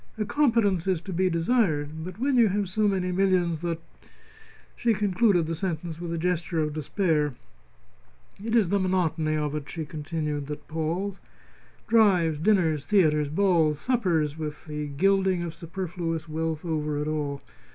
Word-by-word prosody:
"A 215 - -1
competence 215 - +2
is 185 -3 +2
to 190 - -6
be 185 +2 +2
desired. 165 -5 0
But 185 +2 -7
when 270 +3 +1
you 235 -3 +6
have 200 0 0
so 210 +3 +1
many 185 -2 0
millions 180 -3 +1
that 170 -2 -2 0.5
!" - - -24
She 230 -2 +1
concluded 200 -2 +2
the 165 - -3
sentence 165 -1 -4
with 170 -1 -4
a 170 - -2
gesture 170 0 -1
of 150 -1 0
despair. 155 -2 0 1.1
"It 225 +1 -1
is 215 -7 +4
the 200 - +2
monotony 165 -4 0
of 150 -1 -1
it," 150 -1 -5
she 160 -2 -4
continued, 150 -1 -4
"that 150 0 -7
palls. 170 +5 -2 0.7
Drives, 185 -9 +3
dinners, 160 -6 +2
theatres, 150 -7 +3
balls, 165 -3 +2
suppers, 165 - 0
with 150 0 -5
the 150 -1 -4
gilding 190 +4 +2
of 170 -2 -4
superfluous 170 -1 -4
wealth 160 +1 -3
over 150 -2 -1
it 150 +1 -2
all. 145 -2 -3
170 Hz, 160 wpm, -26 LUFS, 155-190 Hz, 1.1 s, you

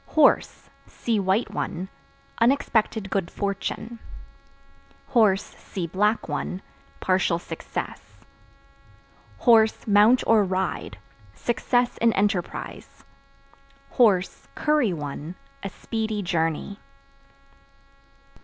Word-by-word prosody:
Horse 305 -3 +3 0.2
(See 230 -3 -1
white 195 +4 +1
one) 180 +3 -3 0.5
unexpected 230 -5 +1
good 190 -4 0
fortune; 205 +3 -4 1.4
(see 190 -2 -7
black 210 +6 +1
one) 165 +5 -4 0.4
partial 185 -2 +2
success; 175 - -7 1.7
(mount 215 +4 +5
or 220 -2 +5
ride) 190 0 -2 0.4
success 245 +1 0
in 230 -1 +3
enterprise; 200 -3 -2 1.5
(curry 300 -8 +2
one) 150 +1 -5 0.3
a 195 - -4
speedy 220 0 -3
journey. 170 +2 -1
200 Hz, 75 wpm, -25 LUFS, 185-225 Hz, 1.7 s, mount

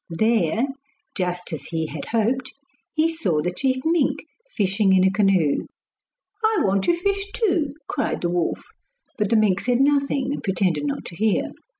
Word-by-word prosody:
There, 220 +2 +1 0.5
just 180 -2 -2
as 150 - -5
he 160 -1 -2
had 155 -1 -6
hoped, 245 +4 0 0.4
he 315 +1 +2
saw 320 - 0
the 180 - -1
chief 260 +4 0
mink 325 -3 +1 0.2
fishing 200 - +2
in 185 -1 +5
a 190 - +4
canoe. 190 -7 +2 0.8
'I 435 -1 +3
want 195 0 +1
to 345 - +3
fish 395 +2 -1
too,' 345 - 0
cried 285 - -2
the 175 - 0
wolf. 175 -1 -1 0.6
But 210 -2 +1
the 230 - +3
mink 210 -4 +3
said 245 +2 +1
nothing 280 -1 +2
and - - -4
pretended 180 -6 0
not 140 - -3
to 170 - -9
hear. 215 +2 +1
215 Hz, 170 wpm, -23 LUFS, 180-280 Hz, 0.8 s, in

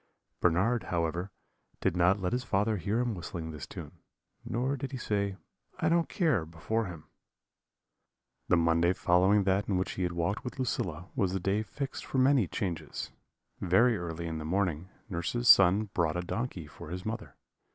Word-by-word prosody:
"Bernard, 100 +8 +2
however, 85 +2 -1 0.5
did - - +1
not 90 +3 +4
let 90 +1 -1
his 125 +1 0
father 105 0 +1
hear 100 +7 0
him 120 -2 0
whistling 85 -3 -5
this 75 -3 -7
tune, - - -9 0.4
nor 130 +4 -1
did 135 0 -5
he - - -2
say, 100 -4 -1 0.4
'I 160 - +2
don't 170 0 +2
care,' 155 - +2
before 85 +8 -2
him. 85 -5 -8 1.4
"The 90 - +4
Monday 85 +1 +3
following 95 +3 +4
that 95 +2 +1
in 95 - +2
which 90 - -1
he - - -5
had 90 -1 0
walked 85 +5 -1
with 125 - -6
Lucilla 90 - -2
was 95 -2 +1
the 95 - 0
day 100 +3 +1
fixed 135 +5 -5
for - - -4
the 130 - +5
many 130 -7 +4
changes. 85 -5 -4 0.5
Very 115 +7 +4
early 85 -3 -4
in 80 -1 -3
the - - -5
morning, 90 0 -1 0.2
nurse's 110 +6 -2
son 100 +1 +7
brought 85 -1 +1
a - - 0
donkey 95 -2 -4
for 75 +1 -11
his 90 +2 -5
mother. 110 0 -5
95 Hz, 180 wpm, -30 LUFS, 85-115 Hz, 1.4 s, son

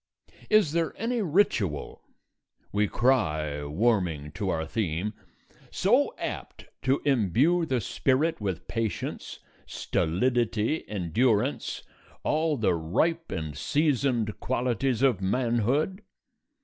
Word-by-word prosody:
Is 215 -8 +4
there 165 0 -1
any 230 +2 0
ritual 145 - 0 0.7
(we 105 +1 +2
cry, 80 - +1
warming 85 -4 0
to 100 +4 -3
our 80 -2 -1
theme) 95 +2 -2 0.6
so - - +2
apt - - -6 0.2
to 135 +2 +1
imbue 140 - +3
the 130 -3 +1
spirit 140 +7 0
with 95 -5 -3
patience, 115 -2 -3 0.3
stolidity, 115 - 0
endurance, 105 +4 0 0.4
all 155 -1 +1
the 110 -6 +2
ripe 130 - 0
and 80 -4 -4
seasoned 130 - 0
qualities 125 0 0
of 125 -8 +3
manhood? 125 - 0
120 Hz, 100 wpm, -27 LUFS, 95-145 Hz, 0.7 s, Is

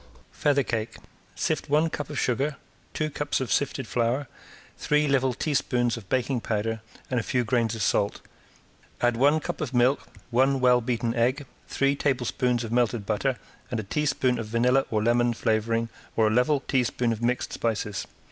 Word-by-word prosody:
~FEATHER 145 -1 +2
CAKE~ 110 -2 -3 0.4
Sift - - -1
one 155 +3 +3
cup 150 - -4
of - - -5
sugar, 135 +4 0 0.4
two 155 -1 -2
cups 145 +1 -1
of 130 -6 -3
sifted 135 0 0
flour, 120 +4 0 0.5
three 150 0 +1
level 135 -2 +2
teaspoons 125 -4 0
of 105 -6 -10
baking 130 -1 0
powder 110 +1 -2 0.3
and 125 - +2
a - - 0
few 125 +2 0
grains 115 -1 +1
of 110 - -2
salt. 100 +2 +1 0.8
Add 120 -1 +2
one 145 +6 +4
cup 155 - -5
of 135 -4 -3
milk, 125 +3 +3 0.2
one 135 +3 +3
well 125 -1 +4
beaten 120 -1 -1
egg, 125 +5 +1 0.2
three 140 0 +1
tablespoons 125 -3 0
of 115 - -5
melted 120 -3 +1
butter 125 +5 0 0.3
and 120 - -2
a - - -3
teaspoon 130 +1 0
of 110 - -4
vanilla 125 +4 +2
or 105 -1 0
lemon 120 +1 +2
flavoring 115 +1 0 0.3
or 110 - +3
a 110 - +3
level 125 +5 +3
teaspoon 125 -3 0
of 110 - -7
mixed 125 +1 -1
spices. 105 -3 -2
125 Hz, 175 wpm, -26 LUFS, 115-135 Hz, 0.8 s, one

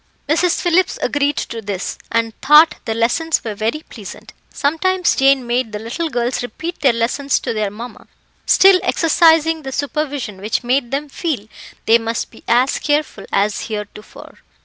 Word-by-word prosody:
Mrs. 335 +4 +2
Phillips 360 +1 +2
agreed 290 0 0
to 230 -1 -4
this, 195 -3 -5
and 230 -1 0
thought 300 +4 +6
the 225 - -2
lessons 275 +8 0
were 220 - -4
very 225 +9 -2
pleasant. 210 -5 -11 0.2
Sometimes 350 +5 0
Jane 270 -1 +3
made 240 -1 -1
the - - -2
little 235 +10 -4
girls 245 -1 -1
repeat 310 +9 -6
their 275 -4 +5
lessons 245 +4 0
to - - -3
their 215 -2 -1
mamma, 230 +5 -10 0.4
still 385 -1 +6
exercising 325 -2 +3
the 270 -2 -6
supervision 280 -7 -3
which 215 +5 -2
made 250 0 0
them 280 +3 -3
feel 275 - -4 0.4
they 230 +1 +5
must 230 0 -3
be - - -17
as 245 +3 +2
careful 295 -1 -1
as 205 +1 0
heretofore. 210 -1 -9
265 Hz, 160 wpm, -18 LUFS, 225-310 Hz, 0.4 s, thought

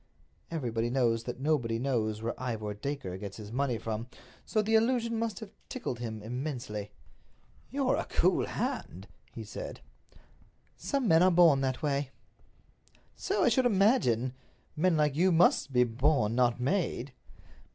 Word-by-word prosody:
Everybody 120 -8 -2
knows 115 -3 +1
that 125 - -5
nobody 130 -6 0
knows 110 -4 -1
where 115 - -1
Ivor 110 -4 -3
Dacre 105 -5 -5
gets 100 -1 -7
his 105 -1 -9
money 130 -1 0
from, 110 +1 -4 0.4
so 220 - -1
the 220 +2 -1
allusion 230 0 +2
must 225 -4 -2
have 210 -2 -8 0.2
tickled 185 - -4
him 110 -3 -5
immensely. 120 -4 -4 0.8
"You're 270 -1 +1
a - - -2
cool - - +1
hand," - - -4 0.2
he - - -7
said. - - -7 0.9
"Some 275 -4 -1
men 160 -2 +5
are 185 - +6
born 170 -6 +5
that 130 +3 -2
way." 140 -2 0 1.1
"So - - 0
I - - +5
should 260 -2 +3
imagine. 190 - +2 0.4
Men 165 +1 +2
like 150 -2 +2
you 180 +4 +3
must 165 -4 +4
be 125 -1 +4
born, 120 -1 +1
not 120 0 +2
made." 140 -3 -1
135 Hz, 150 wpm, -30 LUFS, 115-180 Hz, 1.1 s, are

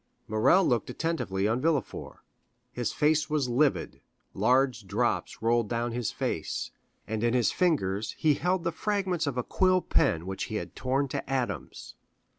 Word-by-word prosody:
Morrel 110 - +4
looked 120 -5 +1
attentively 125 - -1
on 115 +3 0
Villefort. 155 -2 -2 0.5
His 120 -2 -2
face 155 +1 +2
was 150 -4 +1
livid, 120 - +1 0.3
large 130 -4 +2
drops 110 +3 -1
rolled 115 -1 +2
down 120 0 -1
his 120 -1 -2
face, - - -3 0.4
and 110 0 -2
in 120 +1 +2
his 120 -2 +3
fingers 110 - 0
he 155 -2 +3
held 180 +4 0
the 170 - 0
fragments 185 -3 -1
of 135 -3 -2
a 125 - 0
quill 185 +5 +3
pen 80 +1 +1
which 95 0 -3
he 110 - -6
had - - -5
torn 135 +2 0
to - - -4
atoms. 120 - -3
125 Hz, 160 wpm, -28 LUFS, 110-155 Hz, 0.5 s, Morrel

